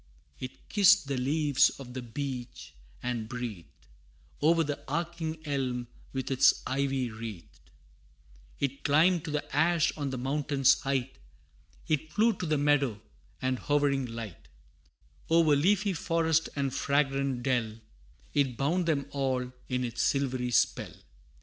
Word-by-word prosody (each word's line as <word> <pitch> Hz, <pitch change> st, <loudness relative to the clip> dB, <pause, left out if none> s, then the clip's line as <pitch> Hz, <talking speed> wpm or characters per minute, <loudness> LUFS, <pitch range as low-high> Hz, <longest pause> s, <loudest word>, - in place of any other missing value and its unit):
It 130 Hz, 0 st, -9 dB
kissed 205 Hz, -3 st, +5 dB
the 140 Hz, -, -1 dB
leaves 140 Hz, +1 st, +3 dB
of 125 Hz, -2 st, -9 dB
the 130 Hz, -, -4 dB
beech, 125 Hz, 0 st, -6 dB, 0.3 s
and 120 Hz, -3 st, -3 dB
breathed 115 Hz, -, -7 dB, 0.6 s
O'er 165 Hz, +2 st, +4 dB
the 145 Hz, -2 st, -4 dB
arching 165 Hz, +1 st, -3 dB
elm, 130 Hz, -4 st, -2 dB, 0.2 s
with 135 Hz, 0 st, -4 dB
its 130 Hz, -, +4 dB
ivy 135 Hz, -2 st, -1 dB
wreathed: 110 Hz, -9 st, -9 dB, 0.9 s
It 140 Hz, -1 st, -2 dB
climbed 160 Hz, +4 st, +3 dB
to -, -, -4 dB
the 150 Hz, 0 st, -3 dB
ash 165 Hz, +2 st, +3 dB
on 145 Hz, -2 st, -3 dB
the 130 Hz, -, -4 dB
mountain's 140 Hz, +1 st, +2 dB
height 135 Hz, -, -2 dB, 0.7 s
It 155 Hz, 0 st, -1 dB
flew 225 Hz, +2 st, +3 dB
to 180 Hz, -, -3 dB
the 155 Hz, -1 st, +2 dB
meadow, 140 Hz, -6 st, +2 dB, 0.4 s
and 130 Hz, -1 st, 0 dB
hovering 140 Hz, -3 st, +1 dB
light 115 Hz, -5 st, -8 dB, 0.8 s
O'er 165 Hz, -2 st, +5 dB
leafy 195 Hz, +6 st, +2 dB
forest 165 Hz, -1 st, +1 dB
and 135 Hz, -2 st, -1 dB
fragrant 140 Hz, -3 st, 0 dB
dell, 120 Hz, -4 st, 0 dB, 0.6 s
It 135 Hz, -5 st, +1 dB
bound 170 Hz, +6 st, +1 dB
them 145 Hz, -4 st, +1 dB
all 130 Hz, -2 st, -1 dB, 0.2 s
in 125 Hz, -1 st, 0 dB
its 120 Hz, -1 st, -3 dB
silvery 130 Hz, -2 st, 0 dB
spell. 120 Hz, -, +1 dB
140 Hz, 135 wpm, -29 LUFS, 125-155 Hz, 0.9 s, kissed